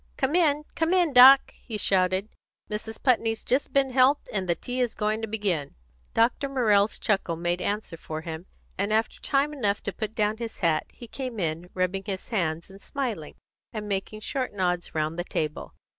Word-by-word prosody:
"Come 265 +2 0
in, 300 -4 +3
come 330 +3 +1
in, 345 -5 +2
Doc!" 260 +2 +8
he 220 -3 -5
shouted. 185 0 +2 0.4
"Mrs. 220 +1 -4
Putney's 225 -3 +2
just 260 +3 0
been 275 -1 +2
helped, 260 +3 +3
and 190 -3 -1
the 170 - +3
tea 245 +9 -5
is 245 -2 -1
going 215 +1 -1
to 225 - -3
begin." 200 -9 -2 0.4
Dr. 240 +5 +2
Morrell's 215 -6 +3
chuckle 195 -6 0
made 175 +2 -1
answer 205 -4 -3
for 155 0 -6
him, 160 +1 -7 0.3
and 200 +2 0
after 220 +1 0
time 285 +1 +1
enough 210 -8 -1
to 200 - -3
put 215 0 -5
down 210 0 +1
his 230 -1 -6
hat, 165 -4 +1
he 240 - -12
came 250 -2 -5
in, 165 0 -2
rubbing 185 +1 -1
his 190 -2 -4
hands 170 -5 -1
and 195 +1 -14
smiling, 235 - -4 0.4
and 210 -2 -5
making 205 +2 -3
short 255 +2 -3
nods 180 -3 -1
round 155 +2 -1
the - - 0
table. 155 -3 -4
210 Hz, 190 wpm, -26 LUFS, 180-250 Hz, 0.4 s, Doc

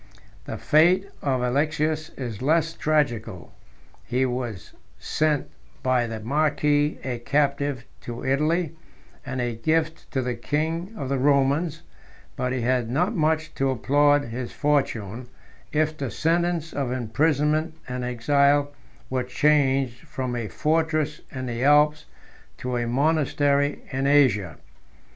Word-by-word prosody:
19 - - -4
The - - -6
fate 180 +6 +3
of 130 -3 0
Alexius 155 +4 0
is 120 -5 -5
less 160 +4 +2
tragical: 120 - -1 0.5
he 130 +2 0
was 125 -6 -4 0.2
sent 155 -2 0 0.4
by 130 -2 +2
the 115 -1 -5
marquis 145 +4 +1
a 125 -2 -3
captive 140 -1 0
to 120 0 -7
Italy, 155 +4 +1 0.5
and 130 -2 -4
a 120 -1 -1
gift 160 +7 -1
to 130 -2 -1
the 125 0 -1
king 160 - -2
of 135 - -4
the 135 0 0
Romans; 145 +4 +2 0.5
but 125 - -1
he 130 -1 -1
had 125 -1 +1
not 175 - 0
much 155 -2 0
to 135 0 0
applaud 145 +3 +3
his 120 +1 -5
fortune, 125 -6 -1 0.4
if 155 0 +1
the 140 -4 -4
sentence 165 +2 0
of 135 -3 -2
imprisonment 150 +6 +1
and 125 0 -4
exile 140 +4 +2 0.3
were 130 -1 -1
changed 135 -1 +2
from 130 -2 -3
a 115 -2 -3
fortress 155 - 0
in 130 -2 -5
the 120 0 -3
Alps 150 +1 +4 0.5
to 125 0 -3
a 120 -1 -1
monastery 145 +1 +1
in 135 +1 0
Asia. 130 - +3
140 Hz, 135 wpm, -24 LUFS, 125-155 Hz, 0.5 s, Alps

